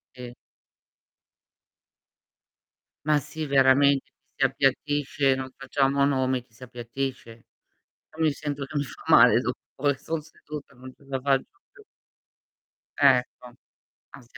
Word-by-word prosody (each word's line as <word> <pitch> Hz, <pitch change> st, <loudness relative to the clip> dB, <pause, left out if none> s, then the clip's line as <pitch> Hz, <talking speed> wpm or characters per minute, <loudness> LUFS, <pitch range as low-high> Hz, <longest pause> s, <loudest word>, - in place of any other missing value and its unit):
Sì. 125 Hz, -1 st, -9 dB, 2.7 s
Ma 150 Hz, -1 st, +3 dB
sì, 155 Hz, +3 st, -6 dB
veramente 140 Hz, 0 st, +4 dB, 0.2 s
ti -, -, -46 dB
si 135 Hz, -, +2 dB
appiattisce, 135 Hz, +1 st, +1 dB
non 130 Hz, 0 st, -6 dB
facciamo 135 Hz, +1 st, 0 dB
nomi, 130 Hz, -2 st, 0 dB
ti 115 Hz, -3 st, -30 dB
si 120 Hz, -, -13 dB
appiattisce. 120 Hz, -1 st, -6 dB, 0.6 s
Però 160 Hz, +1 st, -4 dB
mi 155 Hz, -, +3 dB
sento 145 Hz, -1 st, -5 dB
che 145 Hz, -, -12 dB
mi 145 Hz, -, +1 dB
fa 135 Hz, -, -12 dB
male -, -, +6 dB
dottore, 140 Hz, 0 st, -2 dB
son 160 Hz, +3 st, -3 dB
seduta, 150 Hz, -1 st, -11 dB
non 130 Hz, +1 st, -12 dB
ce 140 Hz, -, -23 dB
la 135 Hz, -1 st, -3 dB
faccio 135 Hz, 0 st, +1 dB, 0.3 s
più. 420 Hz, -, -18 dB, 1.1 s
Ecco. 125 Hz, -2 st, +2 dB, 0.6 s
Ah -, -, -13 dB
si 120 Hz, +2 st, -17 dB
135 Hz, 130 wpm, -25 LUFS, 130-145 Hz, 2.7 s, male